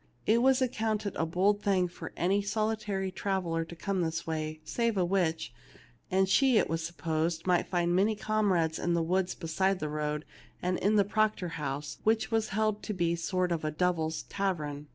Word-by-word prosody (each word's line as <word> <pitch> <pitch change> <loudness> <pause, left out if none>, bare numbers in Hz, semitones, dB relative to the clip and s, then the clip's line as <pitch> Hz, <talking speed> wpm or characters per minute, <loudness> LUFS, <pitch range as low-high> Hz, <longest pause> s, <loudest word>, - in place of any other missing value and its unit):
It 230 +2 +4
was 265 +1 +4
accounted 220 -4 -1
a 165 - 0
bold 195 +5 +2
thing 190 -3 +2
for 175 - -8
any 195 +4 +2
solitary 210 -2 -1
trav 190 0 -1
eller 165 -1 -1
to 165 +1 -10
come 190 +2 -1
this 165 0 -2
way, 155 -1 -3
save 235 +1 0
a 180 - +3
witch, 170 -8 0 0.6
and 190 +1 +3
she, 255 +5 +4
it - - +3
was 165 +1 -2
supposed, 165 0 -2
might 180 -1 +2
find 175 -1 +1
many 205 +4 +3
comrades 195 -7 +1
in 175 0 +1
the 170 - +1
woods 185 +2 0
beside 190 +4 0
the 155 -3 -3
road 150 0 -2 0.3
and 180 0 -1
in 205 +3 +2
the 200 -2 +4
Proctor 215 -3 +1
house, 145 -2 -4
which 220 +2 +2
was 225 -1 +1
held 215 0 0
to 210 - -4
be 170 -2 +1
a - - 0
sort 180 +1 -1
of 165 -2 0 0.2
devils' 160 -3 0
tavern. 150 -7 -3
185 Hz, 195 wpm, -30 LUFS, 165-205 Hz, 0.6 s, It